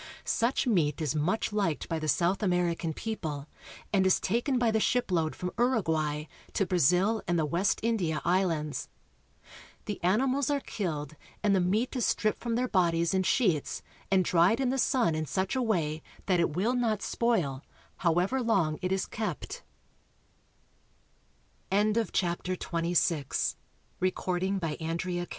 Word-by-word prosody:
Such 235 +5 +1
meat 165 - +2
is 155 -3 -1
much 180 +8 0
liked 195 -7 0
by 165 - -2
the 155 - -3
South 175 +6 +2
American 180 -3 0
people, 155 -7 -4 0.5
and 195 -2 +4
is 190 - +4
taken 240 +6 0
by 240 -2 +2
the 220 - +2
ship 245 -1 +1
load 160 -3 +1
from 180 0 -4
Uruguay 160 - +1 0.3
to 195 - +1
Brazil 185 +6 +3
and 175 -1 +1
the 160 - +2
West 175 +6 +1
India 185 -10 0
Islands. 170 -4 0 1.0
The 205 -4 -5
animals 255 +9 +2
are 285 -1 +1
killed, 155 - -4 0.3
and 205 -2 +4
the - - +3
meat 210 +9 0
is 250 - 0
stripped 215 0 +1
from 235 -1 -2
their 250 +2 +1
bodies 170 -5 +2
in 190 - +3
sheets 185 - +1 0.3
and 190 -2 +3
dried 180 +7 +4
in 265 -2 +1
the 265 +1 0
sun 240 - +2
in 155 0 -2
such 190 - -1
a 260 - +1
way 165 -9 0 0.2
that 185 -3 +2
it 165 -3 +1
will 210 +8 +1
not 225 -4 0
spoil, 170 - 0 0.3
however 180 +9 +1
185 Hz, 130 wpm, -29 LUFS, 165-225 Hz, 1.0 s, and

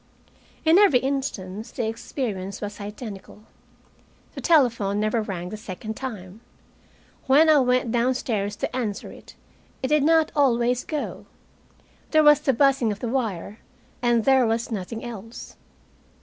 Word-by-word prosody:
In 325 +4 +6
every 400 -11 +6
instance 240 -7 -3
the 235 - -3
experience 220 -4 -4
was 205 0 -6
identical. 210 -1 -9 0.9
The - - -7
telephone 235 - +2
never 215 +2 +1
rang 180 -4 -5
the 215 - -6
second 215 +1 -7
time. 210 -6 -7 0.9
When 305 +4 +6
I 300 - +6
went 250 -2 +1
downstairs 235 -4 0
to 245 - -4
answer 220 -6 -3
it - - -14 0.5
I - - +1
did 300 +2 +3
not 320 +1 +3
always 245 -3 +2
go 305 -2 -5 0.8
there 310 -1 +4
was 295 -1 +7
the 295 -2 +1
buzzing 265 -3 +2
of 205 - -5
the 240 - -3
wire, 220 -5 -3 0.4
and 240 -2 +2
there 265 -3 +4
was 225 +2 -1
nothing 220 +3 -5
else. 225 -1 -9
235 Hz, 140 wpm, -24 LUFS, 210-265 Hz, 0.9 s, was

